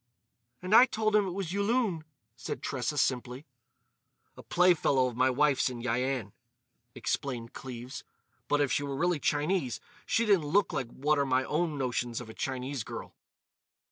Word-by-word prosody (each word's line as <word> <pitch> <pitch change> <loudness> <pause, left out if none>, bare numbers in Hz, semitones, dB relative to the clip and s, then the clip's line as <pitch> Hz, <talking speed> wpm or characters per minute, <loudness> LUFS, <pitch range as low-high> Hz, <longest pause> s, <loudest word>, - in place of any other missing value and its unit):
"And 185 +3 -1
I 250 +3 +9
told 215 -2 0
him 205 -2 +4
it 185 +1 -5
was 185 -3 -3
Yulun," 200 -4 +1 0.3
said 115 - -6
Tressa, 130 +2 -2
simply. 130 +1 -1 0.9
"A - - -11
playfellow 175 -7 +3
of 125 -2 -3
my 130 +2 +3
wife's 140 0 +2
in 125 -2 -7
Yian," 125 -2 -1 0.6
explained 120 -4 -3
Cleves. 125 -1 -8 0.4
"But 145 0 +2
if 140 -4 +1
she - - +1
were 140 -1 -3
really 175 +2 +1
Chinese 145 -3 0 0.3
she 230 - +2
didn't 195 -8 +3
look 195 +7 +2
like 130 - -2
what 150 +4 0
are 140 - +2
my 130 0 +2
own 155 +1 -1
notions 120 -3 -2
of 115 -2 -8
a - - -12
Chinese 130 0 -3
girl." - - -8
140 Hz, 165 wpm, -30 LUFS, 125-175 Hz, 0.9 s, I